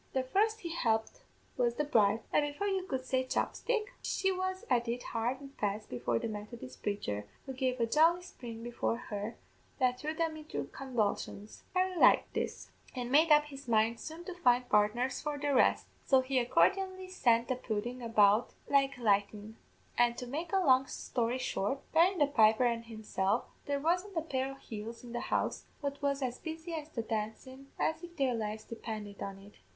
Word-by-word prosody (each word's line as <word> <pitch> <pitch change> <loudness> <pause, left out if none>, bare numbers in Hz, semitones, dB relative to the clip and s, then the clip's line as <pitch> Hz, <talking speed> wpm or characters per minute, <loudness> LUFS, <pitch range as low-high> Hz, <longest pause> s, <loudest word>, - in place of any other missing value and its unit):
The 260 - +1
first 430 +11 +1
he 340 - -4
helped 225 - 0 0.4
was 240 -1 +2
the 300 - 0
bride, 220 -6 +3
and, - - +5
before 290 +7 -3
you 385 -2 -1
could 260 -4 -3
say 260 0 +1
chopstick, 430 - -1
she 385 0 0
was 375 0 -2
at 240 -1 +2
it 240 +1 -2
hard 235 +3 -1
an' 280 -1 -10
fast 210 +1 -2
before 120 -1 0
the - - -2
Methodist 210 - -8
praicher, 105 - -2 0.2
who 265 - -5
gave 255 -1 -1
a 230 - +3
jolly 325 +8 +4
spring 230 -9 -9
before 240 -1 -1
her 210 -2 -5 0.4
that 250 -2 +2
threw 310 +3 -3
them 320 -1 -1
into 305 - -4
convulsions. 215 -5 -2
Harry 370 0 +2
liked - - +5
this, - - -3 0.2
and 250 -1 -3
made 310 +3 +5
up 300 0 +7
his 280 -2 -11
mind 225 0 +2
soon 320 +2 -7
to 370 - -5
find 250 -8 +3
partners 225 +5 +2
for 295 -1 -3
the 285 0 0
rest; - - +4 0.2
so 265 -1 +5
he 260 -1 +1
accordianly 375 +9 +2
sent 235 -10 +2
the 255 - 0
pudden 240 +1 -3
about 215 -1 +3
like 275 -1 +3
lightnin'; 210 -1 0 0.4
an' 240 0 +4
to 250 - -5
make 310 +7 -4
a 390 - +3
long 265 -7 +4
story 240 -1 -1
short, 255 0 -1
barrin' 350 +4 +4
the 295 - +5
piper 225 -3 +4
an' 235 -1 +1
himself, 220 -2 -1 0.2
there 285 -1 0
wasn't 355 +5 0
a - - +2
pair 265 -4 -2
o' - - -9
heels 230 -2 -8
in 240 - -9
the 240 - -1
house - - 0
but 280 0 -4
was 280 -1 0
as 250 -1 -3
busy 325 +1 -6
at 310 -1 -5
the 230 - -1
dancin' 225 +5 -4
as 320 0 0
if 345 -1 -10
their 270 -3 +2
lives 215 -1 -3
depinded 215 -3 -7
on 195 0 -5
it. 200 +1 -16
255 Hz, 190 wpm, -32 LUFS, 225-300 Hz, 0.4 s, up